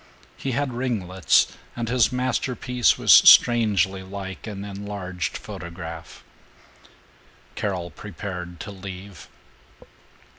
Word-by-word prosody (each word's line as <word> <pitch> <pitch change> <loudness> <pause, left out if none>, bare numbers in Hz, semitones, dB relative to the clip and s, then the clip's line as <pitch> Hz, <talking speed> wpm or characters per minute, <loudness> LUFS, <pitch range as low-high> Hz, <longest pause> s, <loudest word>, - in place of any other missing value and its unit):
He 135 - -4
had 140 0 -1
ringlets, 100 -8 +1 0.2
and 120 -1 -3
his 125 0 +2
masterpiece 125 0 0
was - - +5
strangely 100 -6 +6
like 95 +2 -8
an 100 -2 -6
enlarged 100 -3 -5
photograph. 85 -4 -9 1.3
Carol 90 -4 -3
prepared 90 -3 -7
to - - -7
leave. 95 0 -10
100 Hz, 90 wpm, -24 LUFS, 90-120 Hz, 1.3 s, strangely